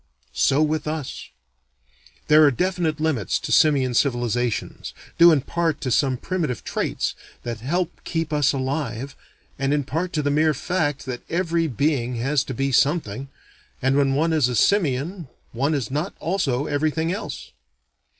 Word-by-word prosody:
So 140 +3 +3
with 155 0 -1
us. 155 -3 -5 1.0
There 155 +1 +7
are 145 - +7
definite 170 +1 -1
limits 155 - 0
to - - -6
simian 135 -5 +4
civilizations, 120 -2 -1 0.2
due 170 0 +9
in 150 -4 +3
part 165 +2 -1
to 130 - -2
some 130 0 +2
primitive 165 -5 -3
traits - - -2 0.3
that 120 -2 -4
help 170 +8 -1
keep 165 -2 -2
us 145 -2 +3
alive, 135 -1 -3 0.4
and 135 +2 +1
in 145 - 0
part 165 +6 -3
to 150 - 0
the 145 - +1
mere 155 +1 +3
fact 150 -3 -1
that 125 -2 -5
every 170 -1 0
being 125 -2 0
has 135 +4 +1
to 130 - -5
be 135 +2 0
something, 135 -3 +1 0.5
and 130 +1 +1
when 140 -1 +2
one 160 +3 +1
is 150 -6 +3
a 125 - -2
simian 165 - +1 0.2
one 140 +6 0
is 130 -4 -3
not 150 +8 -2
also 150 -6 0
everything 155 +3 0
else. 200 - -6
145 Hz, 160 wpm, -23 LUFS, 130-160 Hz, 1.0 s, due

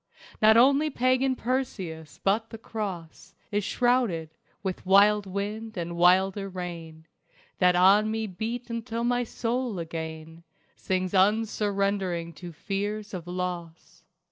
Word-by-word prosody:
Not 220 +1 +7
only 280 +5 +5
pagan 255 0 +1
Perseus 190 - -4
but 220 +3 +1
the 225 - -8
Cross 195 -5 -6 0.2
Is 205 0 0
shrouded 230 -11 +1 0.3
with 190 -2 -3
wild 200 +2 +5
wind 210 +3 -4
and 170 0 -4
wilder 190 +3 +3
rain, 170 -3 -7 0.5
That 180 -1 +4
on 195 +4 +5
me 220 0 -2
beat 230 +5 -5
until 230 0 -3
my 245 0 +1
soul 240 -1 -2
again 160 -1 -6 0.3
Sings 185 0 -2
unsurrendering 200 -3 +1
to 175 +2 -9
fears 205 +5 -4
of 175 -2 -6
Loss. 175 -2 -6
200 Hz, 120 wpm, -27 LUFS, 175-225 Hz, 0.5 s, Not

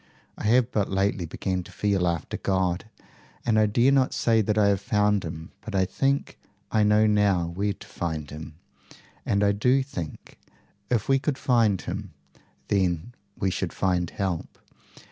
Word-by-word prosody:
I - - -7
have 120 +2 +3
but 105 -2 0
lately 95 -2 0
begun 90 +3 -2
to - - -13
feel 100 -3 +1
after 85 -2 -2
God, 95 -1 0 0.6
and 110 -2 +3
I 110 - +4
dare 120 +6 +3
not 135 -2 +2
say 115 -1 +3
that 105 +1 0
I 105 -1 +5
have 100 -1 +1
found 105 -1 +2
him, 80 -1 -7
but 110 - -6
I 95 -1 +3
think 135 +9 -1 0.3
I 110 - +3
know 105 +1 +4
now 100 -4 +3
where 100 +4 -1
to - - -14
find 80 -3 -4
him. 80 +1 -8 0.7
And 100 0 +2
I 100 - +4
do 125 +7 +2
think, 90 - -8 0.5
if 115 -4 0
we 135 0 +4
could 140 0 -1
find 115 -8 +2
him, - - -6 0.6
then 95 +2 0 0.2
we 95 - 0
should 90 -1 -3
find 90 -3 0
help. 95 -5 -3
100 Hz, 170 wpm, -26 LUFS, 90-110 Hz, 0.7 s, I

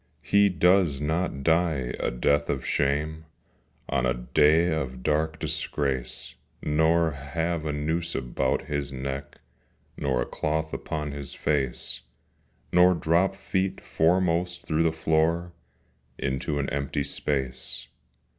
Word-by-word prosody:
He 100 0 +4
does 90 -4 +3
not 80 -1 -1
die 80 -6 +2
a - - 0
death 70 +4 +1
of 65 - -1
shame 75 +3 0 0.6
On 65 -3 0
a 60 -1 +2
day 75 +7 +3
of 65 -5 -3
dark 80 +1 +1
disgrace, 70 -5 -2 0.3
Nor 80 +2 +3
have 80 +3 -2
a - - 0
noose 80 +3 -2
about 65 0 0
his 70 -1 -3
neck, 70 +1 -5 0.6
Nor 65 -3 0
a - - -6
cloth 80 +1 -2
upon 75 -2 -3
his 70 -1 -7
face, 70 -5 -1 0.7
Nor 90 +1 +6
drop 85 +4 +2
feet 95 0 -1
foremost 85 +1 +1
through 80 0 +1
the 80 -1 +3
floor 80 +2 +1 0.7
Into 70 +2 -2
an 70 -1 -1
empty 70 0 -1
space. 65 -3 -3
75 Hz, 125 wpm, -26 LUFS, 70-85 Hz, 0.7 s, Nor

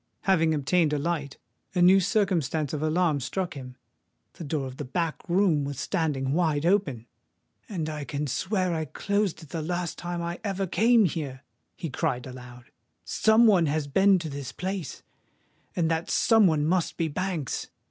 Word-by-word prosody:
Having 165 -5 +3
obtained 150 +2 +2
a - - +1
light, 145 -2 -3 0.4
a 180 - +2
new 190 +2 +7
circumstance 175 - 0
of 150 - -2
alarm 155 -1 +1
struck 175 +7 -3
him: 125 -2 -9 0.6
the - - -9
door 145 -2 -2
of 130 0 -8
the - - -4
back 160 +4 -2
room 175 -5 +3
was 140 -1 -5
standing 140 -4 -1
wide 160 -3 +1
open! 170 - +1 0.6
"And 170 -7 -3
I 155 -2 -4
can 140 +3 -3
swear 185 - -1
that - - -1
I 160 -1 -2
closed 200 +3 -1
it 155 - -14
the 165 - -4
last 175 +1 -3
time 175 0 -4
I 170 +1 -4
ever 195 -2 -1
came 225 +4 +4
here!" 140 -6 -4 0.3
he 165 -6 -5
cried 125 0 -1
aloud. 125 -1 -11 0.3
"Some 220 - +4
one 185 -7 +5
has 150 0 0
been 195 +7 +4
to 170 -2 -4
this 140 -2 -6
place;—and 180 -2 -6
that 165 +1 -1
some 225 -4 +4
one 155 -3 +1
must 175 +1 0
be 165 - 0
Banks! 170 -2 -3
165 Hz, 175 wpm, -27 LUFS, 145-185 Hz, 0.6 s, new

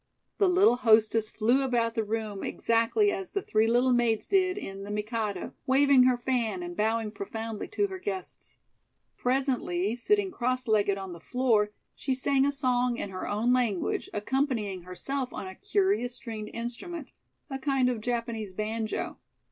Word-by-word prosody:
The 395 -3 +5
little 360 -9 +5
hostess 220 -2 +4
flew 240 +5 +2
about 240 -3 +1
the 225 - 0
room 215 -2 -3
exactly 230 - +2
as 385 -2 -4
the 400 - 0
Three 220 +1 +2
Little 245 +2 +3
Maids 235 -3 +1
did 375 -1 +2
in 195 - -6
"The 200 - -7
Mikado," 210 -2 -3
waving 270 -1 +6
her 255 -1 +4
fan 250 +6 -1
and 350 0 -6
bowing 220 -3 0
profoundly 220 +1 -5
to 410 0 0
her 380 -1 -5
guests. 380 0 -6 0.6
Presently, 250 -7 0
sitting 390 - +1
cross 255 -3 -1
legged 205 -2 +2
on 190 -2 -6
the 170 - -10
floor, 225 +1 +2 0.2
she 265 - -2
sang 270 +1 +2
a - - +2
song 250 -3 +1
in 200 - -4
her 185 - -5
own 225 +4 +1
language, 235 -8 0
accompanying 215 -4 -1
herself 250 +9 -4
on - - -6
a 190 - -7
curious 390 - 0
stringed 215 -3 -6
instrument, 255 +7 -5 0.4
a 270 - -3
kind 270 -2 +2
of 245 -3 -1
Japanese 230 -4 -3
banjo. 215 +2 -3
240 Hz, 165 wpm, -28 LUFS, 215-270 Hz, 0.6 s, waving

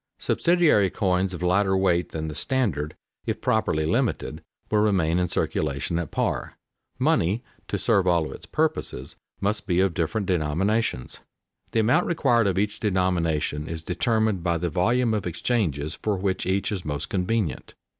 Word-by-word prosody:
Subsidiary 165 - +3
coins 95 -2 0
of 90 -1 -6
lighter 95 +2 +3
weight 90 -2 +2
than 80 -1 -4
the 75 - -4
standard, 80 - -1 0.3
if - - -1
properly 80 0 +1
limited, 85 - -1 0.3
will 105 - +3
remain 90 -6 +2
in 90 - +1
circulation 75 +1 -1
at 85 -5 -3
par. - - -2 0.4
Money 100 +9 +1 0.2
to - - -1
serve 95 -2 +2
all 85 -3 +3
of - - -6
its - - -10
purposes 65 +3 -2 0.3
must 105 +1 -1
be 90 -2 +2
of 95 -2 +2
different 90 +5 -1
denominations. 90 - 0 0.5
The 115 - +2
amount 130 +11 +3
required 120 -9 +3
of 95 -1 0
each 105 +1 0
denomination 85 -6 0
is 80 -1 -5
determined 110 -2 +1
by 85 0 +1
the 85 0 -2
volume 115 +8 +2
of 105 -4 -1
exchanges 80 - -1
for 105 -2 -2
which 95 -1 -1
each 95 +3 0
is 95 -4 -3
most 75 -2 -3
convenient. 95 -1 -1
95 Hz, 160 wpm, -25 LUFS, 80-105 Hz, 0.5 s, Subsidiary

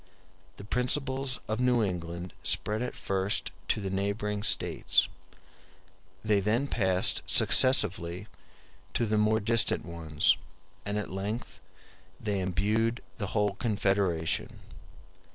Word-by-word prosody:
*e - - -30 0.5
The - - -9
principles 130 +3 -1
of 110 +1 -2
New 125 -2 +2
England 85 -2 -4
spread 105 +2 -1
at 125 - -4
first 95 +1 -1 0.2
to - - +1
the 95 -2 -4
neighboring 100 +1 -2
states; - - +2 1.2
they 105 -2 +3
then 110 +8 0
passed 95 -7 +2
successively 95 -8 +4 0.7
to 120 - +1
the 110 0 +1
more 110 +1 +3
distant 115 -6 +1
ones; 80 -3 +1 0.5
and 105 +1 -2
at 105 - -4
length 100 +5 -5 0.6
they 105 -2 -2
imbued 105 +6 0 0.2
the 100 - -2
whole 105 0 +2
Confederation. 95 -7 -1
105 Hz, 115 wpm, -29 LUFS, 95-115 Hz, 1.2 s, successively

